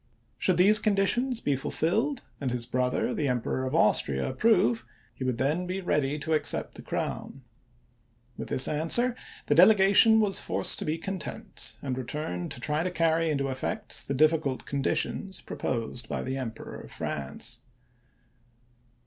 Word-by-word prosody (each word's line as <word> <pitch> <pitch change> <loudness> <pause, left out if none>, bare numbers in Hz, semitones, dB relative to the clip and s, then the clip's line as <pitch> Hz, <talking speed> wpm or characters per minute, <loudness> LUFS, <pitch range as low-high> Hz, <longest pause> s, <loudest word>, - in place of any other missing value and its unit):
Should 185 -3 +2
these 205 +4 +7
conditions 225 +5 +1
be 145 - +1
ful 135 - -4
filled, 230 - 0 0.2
and 135 - -2
his 120 -1 -2
brother 125 +1 -1
the 150 - -1
Emperor 125 +1 -1
of - - -3
Austria 65 -1 +3
approve, 130 - +2 0.3
he - - -7
would 130 -2 -1
then 150 +8 0
be 185 +1 -3
ready 150 -5 0
to 160 +2 -2
accept 155 - 0
the - - -10
crown. - - -5 0.9
With - - -7
this 130 - +3
answer 165 +12 +3 0.3
the - - +2
delegation 200 +5 +6
was 205 -3 +3
forced - - +1
to - - -3
be 155 +1 -1
content, 190 +1 -5
and 130 -2 -2
returned 125 - -4
to - - -8
try 150 +5 -1
to 180 - -1
carry 165 -1 +1
into 140 -2 -1
effect 205 +11 -4
the 140 - -2
difficult 150 -2 +1
conditions 140 +7 -2
proposed 120 -1 -4
by - - -3
the 130 +1 -3
Emperor 125 -4 -6
of - - -13
France. 75 - -4
150 Hz, 155 wpm, -27 LUFS, 130-190 Hz, 0.9 s, these